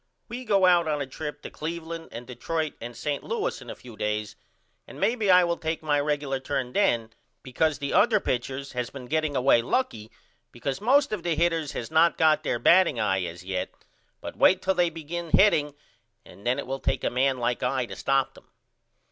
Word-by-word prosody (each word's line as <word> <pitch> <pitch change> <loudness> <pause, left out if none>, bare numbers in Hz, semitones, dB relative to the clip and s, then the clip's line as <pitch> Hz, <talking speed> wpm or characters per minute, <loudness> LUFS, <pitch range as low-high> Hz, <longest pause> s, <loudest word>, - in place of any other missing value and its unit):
We 250 +2 -6
go 200 -4 +3
out 175 -2 +4
on 150 -1 0
a 140 - -2
trip 150 +2 -7
to - - -7
Cleveland 165 +1 -6
and 120 +1 -8
Detroit 155 +6 -3
and 120 0 -7
St. 145 -2 -3
Louis 460 -2 -3
in - - -11
a - - -6
few 120 -3 -13
days 105 0 -3 0.5
and - - -11
maybe 215 +1 +1
I 180 -1 +7
will 170 -1 0
take 160 0 -3
my 145 -2 +2
regular 145 -2 -1
turn 130 -2 -3
then 115 - +1 0.3
because 145 +3 0
the 140 -1 -4
other 220 -3 +4
pitchers 135 -1 -3
has 125 -2 -3
been 135 -2 -9
getting 155 +2 -1
away 130 -2 +4
lucky 115 - -2 0.4
because 135 +7 -4
most 275 +5 +3
of 210 -4 -2
the 170 -1 -1
hitters 165 -2 0
has 115 - -5
no 160 +2 +5
got 155 -1 +4
their - - -1
batting 170 -8 +4
eye 95 -3 +1
as 85 +1 -8
yet 95 -1 -3 0.5
but - - -7
wait 190 0 +4
till 190 - +2
they 175 -2 +2
begin 165 +1 -6
hitting 150 -8 +3 0.5
and 100 - -11
then 125 +2 +2
it 140 - -4
wil 135 +1 -4
take - - -1
a - - 0
man 130 +1 +1
like 120 0 -1
I 125 0 0
to - - -9
stop 135 -1 0
them. - - -18
145 Hz, 205 wpm, -26 LUFS, 125-170 Hz, 0.5 s, I